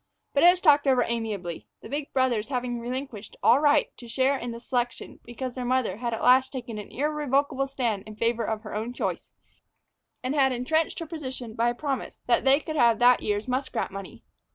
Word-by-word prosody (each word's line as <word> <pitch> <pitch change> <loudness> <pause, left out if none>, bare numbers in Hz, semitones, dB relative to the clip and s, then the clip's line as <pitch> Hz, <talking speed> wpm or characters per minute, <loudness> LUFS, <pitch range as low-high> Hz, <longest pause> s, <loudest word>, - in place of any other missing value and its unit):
But 280 - +2
it 350 - +10
was 355 0 +3
talked 295 -5 +5
over 255 -2 +4
amicably, 210 -8 -4
the - - -9
big 290 +1 -4
brothers 250 -5 +1
having 250 -2 -2
relinquished 245 -3 -6
all 240 +4 +6
right 290 -1 +3
to 240 - -11
a - - -13
share 265 +3 +2
in 245 -3 -4
the 235 - -7
selection 245 -1 -3
because 245 +1 -5
their 255 - -5
mother 255 -3 0
had 235 0 -3
at 225 - -4
last 255 +1 +5
taken 235 -5 -6
an 205 - -9
irrevocable 280 -1 0
stand 240 -7 -2
in 215 - -9
favor 230 +1 0
of 220 0 -3
her 215 - -8
own 225 +3 -3
choice, - - -3 0.9
and 255 +2 -1
had 270 -3 +3
intrenched 310 +6 0
her 330 - -4
position 260 -8 -6
by 235 +1 +1
a 240 - -3
promise 270 -1 -3
that 240 +1 +2
they 270 +2 +5
could 310 0 -5
have 235 -4 +5
that 245 +1 +5
year's 210 +3 -2
muskrat 255 -4 -2
money. 195 -1 -9
250 Hz, 210 wpm, -26 LUFS, 230-275 Hz, 0.9 s, it